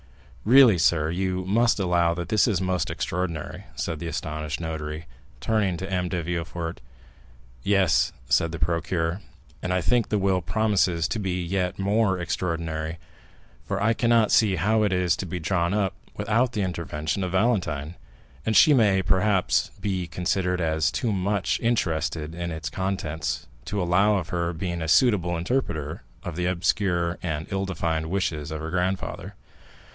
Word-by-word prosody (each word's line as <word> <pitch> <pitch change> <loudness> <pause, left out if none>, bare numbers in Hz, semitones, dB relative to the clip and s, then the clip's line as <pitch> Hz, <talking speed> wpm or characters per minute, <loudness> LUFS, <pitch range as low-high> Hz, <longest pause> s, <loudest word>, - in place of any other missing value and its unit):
"Really, 120 -5 +7
sir, 80 -1 +2
you 95 +1 -1
must 115 +4 +2
allow 85 -3 +2
that 85 -1 -5
this 110 +2 +3
is 100 -6 +1
most 95 -1 -1
extraordinary," 85 -3 -3
said 75 +3 -3
the 85 - -5
astonished 75 -2 -4
notary, 80 -1 -5 0.3
turning 105 -5 0
to 95 - -5
M. 90 -2 -1
de 85 -2 -2
Villefort. 85 0 -4 0.8
"Yes," 95 +1 +3 0.2
said 85 -1 +2
the 85 - -4
procureur, 80 +3 -1 0.4
"and 90 - -2
I 90 0 +1
think 110 +8 +1
the 105 - +1
will 95 -2 +1
promises 90 -2 +1
to 110 - -2
be 90 -3 -2
yet 90 +1 -1
more 100 0 +2
extraordinary, 80 -2 -3 0.7
for - - -1
I 110 +2 +3
cannot 115 -2 +3
see 105 -4 +4
how 105 +6 +2
it 105 -2 +2
is 90 -2 +2
to 95 - -4
be 90 +1 -4
drawn 85 +1 0
up 100 -3 +1 0.2
without 115 +4 +1
the 105 - 0
intervention 85 0 -3
of 90 0 -3
Valentine, 90 -8 0 0.5
and 110 - 0
she 150 - +7
may, 100 -7 +4
perhaps, 95 +2 +2
be 95 -3 -2
considered 90 +1 -1
as 80 -2 +1
too 115 - -1
much 100 0 0
interested 80 -8 -1
in 85 0 -4
its 80 -1 -5
contents 80 -5 -3 0.2
to 105 - -3
allow 100 +4 +3
of 90 -4 -4
her 85 -2 -1
being 85 0 -4
a 80 - -2
suitable 90 - +3
interpreter 85 - -2 0.2
of 85 - -5
the 90 +1 -1
obscure 85 -1 0
and 80 -3 -3
ill 95 0 -1
defined 80 -4 -2
wishes 80 -6 -1
of 80 0 -4
her 80 +1 -5
grandfather." 90 +1 -2
90 Hz, 160 wpm, -25 LUFS, 80-100 Hz, 0.8 s, Really